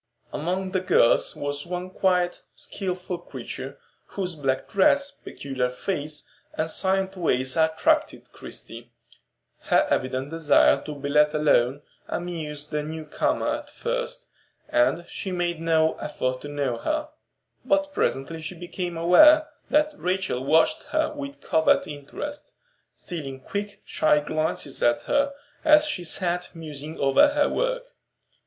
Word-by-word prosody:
Among 185 +4 -2
the 185 - +1
girls 180 -9 +3
was 145 0 -4
one 180 +1 -4
quiet, 180 -2 +1
skilful 180 -2 -4
creature, 135 -2 -7 0.3
whose 185 -3 -4
black 135 -4 -1
dress, 280 +8 +3
peculiar 135 - -4
face, 150 +2 -4 0.3
and 160 +1 -1
silent 190 0 0
ways 130 -7 0
attracted 160 0 +1
Christie. 115 +1 -10 0.7
Her - - +3
evident 130 +2 -1
desire 165 -2 +4
to 150 - -5
be 140 0 -5
let 150 +1 +4
alone 145 -2 +3 0.2
amused 155 -4 -5
the 150 -1 0
new 155 +1 -6
comer 300 - 0
at 295 -1 -11
first, - - -4 0.4
and 305 - +2
she 190 - -5
made 175 -2 -1
no 160 -1 +3
effort 130 -4 -2
to - - -7
know 140 -4 -1
her. 305 - -2 0.5
But 290 0 +1
presently 160 - -1
she 160 +3 -6
became 175 0 -5
aware 300 - +7 0.2
that 300 +1 +3
Rachel 185 - -1
watched 160 - +3
her 310 0 0
with 285 -1 -7
covert 160 0 +3
interest, 220 - -7 0.4
stealing 140 -6 -6
quick, 205 +7 -5
shy 150 -1 +3
glances 155 -2 -2
at 120 0 +3
her 280 0 +2 0.3
as 305 0 +6
she 190 -13 -3
sat 180 +1 -3
musing 155 -1 -7
over 140 - +5
her 290 0 +2
work. - - -2
170 Hz, 135 wpm, -25 LUFS, 145-200 Hz, 0.7 s, aware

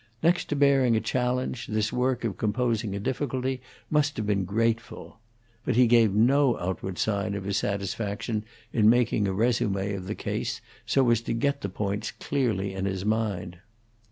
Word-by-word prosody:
Next 175 +2 +3
to 150 - -2
bearing 135 -4 +4
a - - +3
challenge, 125 +1 -1
this 110 0 -1
work 125 0 0
of 110 -5 -1
composing 110 -2 0
a - - -3
difficulty 130 +2 -2 0.3
must 150 0 +2
have 110 - -2
been 100 -2 +1
grateful. 115 +3 -2 0.4
But - - 0
he 125 +1 +6
gave 115 -3 +5
no 125 +5 +4
outward 95 0 -4
sign 100 -1 0
of 100 - -4
his 100 0 -1
satisfaction 105 +2 -2 0.3
in 110 -1 +5
making 115 -3 +3
a - - 0
resume 100 -2 +1
of 95 -2 -5
the 105 - -3
case - - -3 0.3
so 135 -2 +3
as 115 -1 +3
to 115 - -3
get 140 +4 0
the 100 - -3
points 100 +2 -2
clearly 110 -8 -1
in 95 0 -3
his 95 0 -2
mind. 100 -5 -1
110 Hz, 175 wpm, -27 LUFS, 100-125 Hz, 0.4 s, he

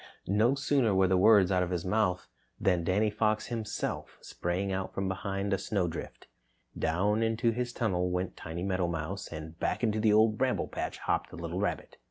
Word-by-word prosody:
No 110 +7 +3
sooner 135 -6 +2
were 95 0 +4
the 95 - +3
words 100 -1 +6
out 90 -1 +3
of 90 - -1
his 90 -1 -2
mouth 90 -2 +1 0.3
than 90 -3 +2
Danny 105 +5 +2
Fox 110 0 +1
himself 115 -3 -4
sprang 90 +3 -3
out 95 0 -3
from 95 0 -1
behind 100 +1 -2
a 95 - +1
snowdrift. 90 -5 -3 0.5
Down 100 +7 +1
into 115 +1 +2
his 120 +1 -2
tunnel 90 -7 0
went 90 +1 -2
Timmy 85 +2 -6
Meadowmouse 90 0 -2
and 80 +1 -8
back - - -1
into 110 -2 +1
the 110 0 +4
Old 110 0 +4
Bramble 130 -1 0
Patch - - -4
hopped - - -1
the - - -10
little - - -4
rabbit. - - -3
95 Hz, 185 wpm, -30 LUFS, 90-110 Hz, 0.5 s, words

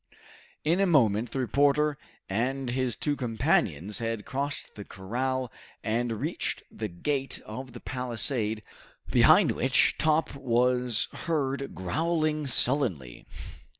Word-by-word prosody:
In 165 +5 +2
a 195 - +3
moment 115 - +3
the - - -5
reporter 145 +3 +2 0.3
and 125 +5 -1
his 125 -2 0
two 145 -1 -1
companions 110 -5 0
had 115 -2 -3
crossed 140 +2 -4
the 105 - -8
corral 125 +7 -3 0.3
and 115 +1 0
reached - - -3
the 110 - -4
gate 135 +9 -2
of 125 +3 -8
the 120 - -8
palisade 115 -3 0 0.5
behind - - +6
which - - +2
Top 155 0 +2
was 125 -2 +1
heard 140 -4 -2
growling 155 - -1
sullenly. 115 - +2
125 Hz, 115 wpm, -28 LUFS, 115-140 Hz, 0.5 s, behind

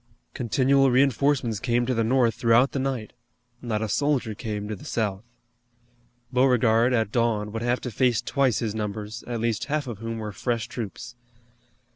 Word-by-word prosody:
Continual 135 +3 +3
reinforcements 130 -3 +2
came 120 0 +1
to 130 - 0
the 115 -1 +1
North 120 0 +3
throughout 115 +4 +3
the 140 - -2
night, 130 -5 -3 0.5
not 110 -3 -2
a - - -1
soldier 135 -1 0
came 105 -1 -5
to 105 - -4
the - - -13
South. 105 -3 -2 1.1
Beauregard, 125 -2 +3
at 110 -4 +1
dawn, 110 -3 0
would 115 +1 -4
have 120 +1 0
to 125 - -5
face 120 +1 +2
twice 135 -3 +1
his 110 -3 -2
numbers, 105 +1 -5
at 120 -1 -3
least 115 -1 -1
half 150 0 -1
of 115 -5 -6
whom 115 0 -4
were 110 -1 -5
fresh 115 +3 -2
troops. 120 +1 -7
115 Hz, 170 wpm, -25 LUFS, 110-130 Hz, 1.1 s, Continual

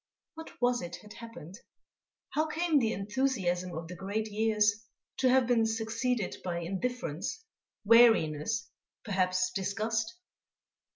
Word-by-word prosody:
What 320 0 -11
was 245 0 +2
it 175 0 -6
had 210 - -12
happened? 230 -5 -10 0.7
How 310 +1 +1
came 320 -1 +2
the 225 -4 +1
enthusiasm 195 -5 -1
of 165 0 -6
the 180 - -8
great 210 +3 -3
years 215 0 +2 0.3
to 260 - +3
have 260 0 +5
been 235 -1 +3
succeeded 225 0 -1
by 170 -2 -2
indifference, 195 - -3 0.4
weariness, 225 -4 +4 0.4
perhaps 185 -3 +1
disgust? 220 +4 -2
220 Hz, 120 wpm, -30 LUFS, 185-245 Hz, 0.7 s, have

